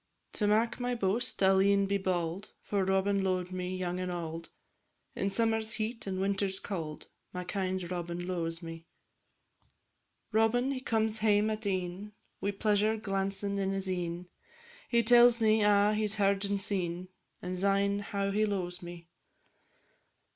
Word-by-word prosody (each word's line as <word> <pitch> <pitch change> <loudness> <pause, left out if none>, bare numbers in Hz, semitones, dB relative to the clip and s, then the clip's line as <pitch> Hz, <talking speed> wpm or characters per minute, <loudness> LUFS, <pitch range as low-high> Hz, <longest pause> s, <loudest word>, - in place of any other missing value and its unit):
To 210 - 0
mak 225 +4 +2
my 245 0 -1
boast 200 -1 0
I 190 - +6
'll 190 0 +5
e'en 200 0 +4
be 200 0 0
bauld, 185 +1 -2
For 200 -2 0
Robin 195 +1 +1
lo'ed 185 -1 -1
me 185 0 -3
young 180 0 -2
and 185 0 -2
auld, 165 -1 -5 0.7
In 195 - 0
summer's 225 +1 0
heat 225 0 -4
and 190 -1 -2
winter's 195 0 0
cauld, 160 -6 -5 0.3
My 180 0 -4
kind 185 0 -2
Robin 175 0 -4
lo'es 170 -2 -3
me. 165 0 -8 1.4
Robin 230 +4 +2
he 265 - -2
comes 220 -3 0
hame 215 0 +3
at 215 -1 -3
e'en 185 +2 -3 0.3
Wi' 200 - 0
pleasure 210 +2 +1
glancin' 195 0 -2
in 195 -1 0
his 195 0 -2
e'en; 175 -1 -3 0.6
He 235 -1 +3
tells 240 +1 +6
me 220 -1 +4
a' 205 0 +4
he 215 0 +1
's 210 - -3
heard 200 -1 +2
and 200 0 0
seen, 185 -3 -2 0.3
And 180 0 -4
syne 200 +1 +2
how 200 -1 -2
he 210 +2 +2
lo'es 185 -3 -2
me. 175 -1 -9
195 Hz, 160 wpm, -31 LUFS, 180-210 Hz, 1.4 s, I